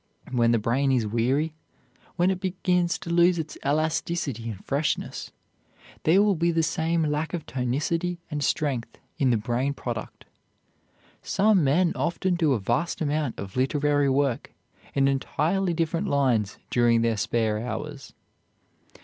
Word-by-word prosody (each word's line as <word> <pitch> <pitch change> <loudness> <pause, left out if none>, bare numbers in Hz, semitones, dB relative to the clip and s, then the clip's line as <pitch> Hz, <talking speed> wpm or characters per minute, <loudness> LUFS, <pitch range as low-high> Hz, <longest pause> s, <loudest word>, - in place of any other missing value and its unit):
When 120 -2 +3
the 120 - +4
brain 125 +5 +1
is 125 -4 +2
weary, 130 +8 0 0.6
when 180 +2 +3
it 185 - -2
begins 180 -2 0
to 170 - -7
lose 175 +1 +4
its 160 -1 -4
elasticity 150 -4 -1
and 100 -3 -8
freshness, 145 +2 -2 0.8
there 185 +6 +5
will 210 -1 +3
be 170 -1 +1
the 165 -1 +2
same 160 +1 0
lack 155 +3 -1
of 165 - -6
tonicity 150 +8 -1
and 150 -1 -2
strength 135 -7 -1 0.2
in 135 - +3
the 120 - +3
brain 120 +5 -1
product. 115 -5 -6 1.0
Some 200 -2 +3
men 165 +6 +3
often 170 +6 0
do 160 -5 +2
a 120 - 0
vast 120 - -1
amount 150 -4 -1
of 95 -1 -7
literary 145 +2 +2
work 135 -2 0 0.4
in 135 -1 +3
entirely 160 +7 0
different 165 +4 -1
lines 125 - +1
during 120 -1 +3
their 115 -1 +2
spare 110 0 0
hours. 120 +3 -6
145 Hz, 145 wpm, -26 LUFS, 120-170 Hz, 1.0 s, there